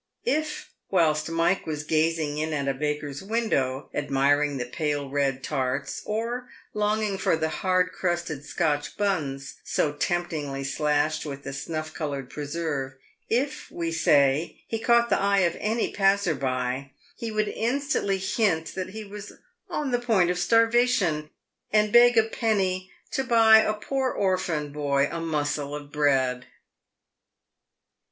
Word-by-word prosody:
If, 310 -9 -1 0.2
whilst 160 -4 +2
Mike 165 +3 +1
was 150 -1 -3
gazing 155 -1 0
in 155 0 -1
at 140 -2 -1
a 135 - +2
baker's 145 0 -3
window, 190 - -1
admiring 145 +1 +1
the 125 - -2
pale 145 +2 -2
red 135 -2 0
tarts, 135 -1 -2
or 235 +4 -3 0.2
longing 210 -1 0
for - - +2
the 160 0 -1
hard 185 +2 +1
crusted 175 -5 -2
Scotch 145 -1 -1
buns, 145 -9 -2
so 145 - 0
temptingly 150 -4 -2
slashed 150 +2 0
with 140 -2 -6
the 135 - -6
snuff 155 +2 -4
coloured 140 -5 -4
preserve 145 -3 -3 0.2
— - - -46
if, 275 +6 -1
we 165 -1 -3
say, 145 -1 +2
he 225 - -2
caught 235 +1 +3
the - - +3
eye 200 0 +3
of 170 -2 +2
any 225 +2 -1
passer 195 -2 +3
by, 130 0 -2 0.2
he 230 -2 -5
would 215 0 0
instantly 240 -4 0
hint 190 -4 0
that 185 -1 -4
he 215 +3 -7
was 205 0 -9 0.4
on 290 -3 -2
the 245 - +2
point 210 -8 +2
of 180 - -2
starvation, 225 -6 +3 0.4
and 210 0 +3
beg 240 0 +7
a 225 - +7
penny 195 -5 -1
" - - -35
to 265 - 0
buy 225 -3 +7
a 215 -1 +1
poor 265 +4 -1
orphan 180 - -1
boy 140 -1 +1
a 170 - -3
mossel 150 -2 -2
of 145 -1 -9
bread." 135 -4 +1
165 Hz, 150 wpm, -26 LUFS, 145-210 Hz, 0.4 s, beg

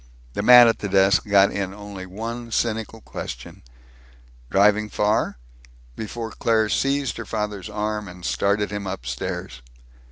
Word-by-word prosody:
The - - -2
man 125 -1 +9
at 115 - +1
the 100 - -4
desk 95 +2 +3
got 100 -1 +5
in 95 -1 -3
only 100 -2 -8
one 115 +5 -6
cynical 115 -1 -2
question, - - -8 0.9
"Driving 105 +3 +3
far?" 105 - 0 0.6
before 110 +1 -5
Claire 110 -2 +1
seized 135 0 0
her - - -6
father's 105 -4 -4
arm 105 0 -3
and 90 -1 -10
started 105 +1 0
him 105 -1 -4
upstairs. 60 -6 -5
105 Hz, 135 wpm, -23 LUFS, 95-110 Hz, 0.9 s, man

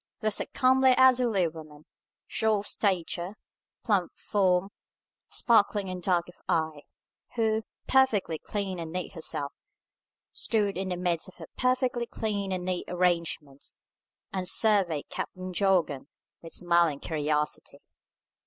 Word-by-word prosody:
Thus 215 -2 +1
a - - -3
comely 260 0 +4
elderly 245 -8 +4
woman, 155 -2 -11 0.4
short 215 -2 +1
of - - +1
stature, 185 -1 -1 0.5
plump 200 -7 +1
of - - -38
form, 190 -2 +2 0.6
sparkling 205 -4 +2
and 185 -1 -5
dark 175 -1 +1
of 175 - -12 0.2
eye, 160 -2 0 0.5
who, 220 -1 +1 0.2
perfectly 220 -11 +3
clean 195 -3 -3
and 165 -1 -5
neat 180 +1 -4
herself, 145 -4 -3 0.8
stood 210 -3 0
in 190 +1 -2
the 180 - -2
midst 175 -2 -1
of - - -17
her - - -11
perfectly 255 -1 +1
clean 205 -4 -2
and 180 -1 -2
neat 180 -1 -1
arrangements, 170 -6 -1 0.6
and 185 -2 0
surveyed 195 -9 +2
Captain 185 0 -5
Jorgan 175 -7 +1 0.3
with 165 - -9
smiling 170 -4 +2
curiosity. 150 -1 -2
185 Hz, 130 wpm, -28 LUFS, 170-215 Hz, 0.8 s, comely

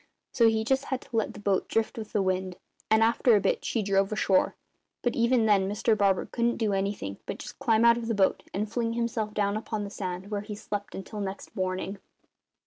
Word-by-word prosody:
So 230 -2 +4
he 220 0 +2
just 265 +4 +1
had 265 -2 -2
to 270 - -10
let 220 - 0
the - - -8
boat 200 -2 0
drift 225 0 0
with 220 -2 -7
the 205 - +1
wind; 185 -1 -1 0.3
and 220 0 +5
after 230 +1 +4
a - - +5
bit 195 - 0
she 225 - -1
drove 195 0 +2
ashore. 200 -3 +2 0.5
But 245 - 0
even 235 -1 +3
then 195 -3 +3
Mr 215 +2 +2
Barber 200 -2 +2
couldn't 235 0 0
do 215 -3 0
anything 195 - -2
but - - -4
just - - -9
climb 230 -4 +3
out 235 0 +6
of 230 - -5
the 230 - 0
boat 195 -1 +2
and 210 +3 -2
fling 230 +1 -1
himself 230 -2 -2
down 200 0 +1
upon 215 -1 -3
the 200 - -6
sand, 185 0 -5
where 205 -1 -1
he 210 0 -7
slept 205 0 -5
until 205 +2 -6
next 195 0 -6
morning. 185 +1 -2
210 Hz, 225 wpm, -28 LUFS, 195-230 Hz, 0.5 s, out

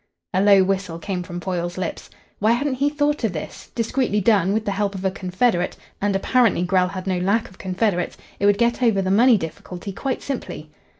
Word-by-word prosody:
A 185 - +2
low 200 -1 +6
whistle 190 -3 -1
came 180 +1 -3
from 175 0 -6
Foyle's 175 -1 -3
lips. 185 -2 -4 0.3
Why 215 +3 +4
hadn't 280 +3 0
he 285 - +4
thought 295 -2 0
of 215 -5 +1
this? 155 - -7
Discreetly 230 -1 0
done, 195 -2 +3
with 215 +1 0
the 200 - 0
help 200 0 -1
of 190 0 -5
a 190 - +2
confederate 185 0 0 0.2
and 200 0 +1
apparently 225 -2 +2
Grell 180 0 +2
had 185 0 -6
no 185 -2 0
lack 200 +5 +1
of 190 - -18
confederates 185 -1 -1 0.2
it 200 - +3
would 205 -1 +4
get 235 +3 +1
over 220 -6 +3
the 185 - 0
money 235 +3 +6
difficulty 180 +2 -6
quite 265 +6 -3
simply. 155 - -5
195 Hz, 205 wpm, -22 LUFS, 185-225 Hz, 0.3 s, low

